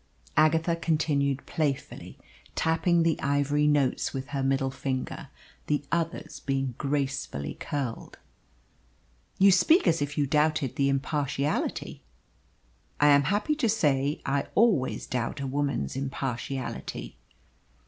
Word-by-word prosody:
Agatha 160 Hz, +2 st, +3 dB
continued 145 Hz, -4 st, 0 dB
playfully, 145 Hz, -4 st, -3 dB, 0.4 s
tapping 165 Hz, +1 st, +2 dB
the 165 Hz, -2 st, +1 dB
ivory 145 Hz, +1 st, +2 dB
notes 145 Hz, -2 st, +1 dB
with 130 Hz, -1 st, -5 dB
her 140 Hz, -1 st, -2 dB
middle 135 Hz, 0 st, +1 dB
finger 130 Hz, -1 st, -4 dB, 0.4 s
the 145 Hz, -1 st, 0 dB
others 165 Hz, -2 st, -2 dB
being 135 Hz, -2 st, -1 dB
gracefully 135 Hz, -, -2 dB
curled. 135 Hz, -6 st, -4 dB, 1.2 s
"You 195 Hz, +1 st, +6 dB
speak 320 Hz, -, +5 dB
as 165 Hz, -2 st, +2 dB
if 145 Hz, 0 st, -3 dB
you 145 Hz, -, +2 dB
doubted 150 Hz, -1 st, +1 dB
the 140 Hz, 0 st, +2 dB
impartiality." 140 Hz, +1 st, -1 dB, 1.0 s
"I 145 Hz, -, +6 dB
am 140 Hz, -1 st, +5 dB
happy 205 Hz, -, +1 dB
to 245 Hz, -7 st, +1 dB
say 145 Hz, -8 st, +1 dB
I 140 Hz, 0 st, 0 dB
always 205 Hz, -, +2 dB
doubt 125 Hz, 0 st, -3 dB
a 140 Hz, -, -3 dB
woman's 135 Hz, -, -1 dB
impartiality." 130 Hz, -, -4 dB
140 Hz, 120 wpm, -27 LUFS, 135-155 Hz, 1.2 s, You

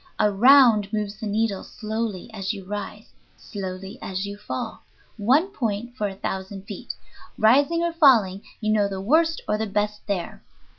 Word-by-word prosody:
Around 215 Hz, 0 st, +5 dB
moves 210 Hz, -1 st, -3 dB
the 220 Hz, -, -4 dB
needle 210 Hz, -1 st, 0 dB
slowly 220 Hz, -3 st, -4 dB
as 195 Hz, 0 st, -3 dB
you 195 Hz, -3 st, -9 dB
rise, 205 Hz, +2 st, -6 dB, 0.3 s
slowly 195 Hz, +2 st, -7 dB
as 190 Hz, +1 st, -3 dB
you 200 Hz, 0 st, -6 dB
fall, 225 Hz, +3 st, -6 dB, 0.3 s
one 260 Hz, -, +3 dB
point 235 Hz, -, -3 dB
for 210 Hz, -5 st, -1 dB
a 195 Hz, -, -7 dB
thousand 190 Hz, 0 st, -5 dB
feet. -, -, -7 dB, 0.4 s
Rising 285 Hz, +10 st, +4 dB
or 340 Hz, -1 st, 0 dB
falling, 230 Hz, -, +4 dB, 0.2 s
you 215 Hz, -1 st, 0 dB
know 205 Hz, -2 st, +3 dB
the 195 Hz, -1 st, -5 dB
worst 320 Hz, +11 st, +2 dB
or 210 Hz, 0 st, 0 dB
the 220 Hz, -, -1 dB
best 210 Hz, +1 st, -1 dB
there. 195 Hz, -4 st, -3 dB
210 Hz, 160 wpm, -24 LUFS, 200-240 Hz, 0.4 s, Around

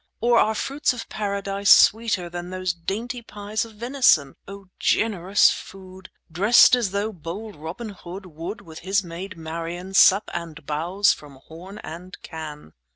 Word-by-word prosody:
Or 235 Hz, 0 st, +4 dB
are 220 Hz, +1 st, +2 dB
fruits 275 Hz, +4 st, 0 dB
of 235 Hz, -2 st, -7 dB
Paradise 200 Hz, -1 st, -2 dB
Sweeter 220 Hz, -5 st, +5 dB
than 175 Hz, +1 st, -7 dB
those 185 Hz, -1 st, -2 dB
dainty 220 Hz, +9 st, -4 dB
pies 210 Hz, 0 st, -4 dB
Of 225 Hz, -1 st, -14 dB
venison? 235 Hz, -, +2 dB
O 195 Hz, 0 st, -10 dB
generous 200 Hz, -3 st, +3 dB
food! 190 Hz, -1 st, -10 dB, 0.2 s
Drest 205 Hz, +9 st, +6 dB
as 240 Hz, -5 st, -1 dB
though 200 Hz, +3 st, -2 dB
bold 190 Hz, +6 st, -7 dB
Robin 165 Hz, +10 st, -7 dB
Hood 190 Hz, -1 st, -9 dB
10 180 Hz, -4 st, -14 dB
Would, 170 Hz, +7 st, -6 dB
with 160 Hz, -1 st, -11 dB
his 195 Hz, +3 st, 0 dB
maid 180 Hz, +3 st, -8 dB
Marian, 165 Hz, +3 st, -6 dB
Sup 195 Hz, +2 st, +5 dB
and 165 Hz, -3 st, -6 dB
bowse 175 Hz, +7 st, +1 dB
from 145 Hz, -2 st, -13 dB
horn 180 Hz, +5 st, -11 dB
and 170 Hz, +4 st, -9 dB
can. 150 Hz, -, -9 dB
190 Hz, 160 wpm, -23 LUFS, 170-210 Hz, 0.2 s, Drest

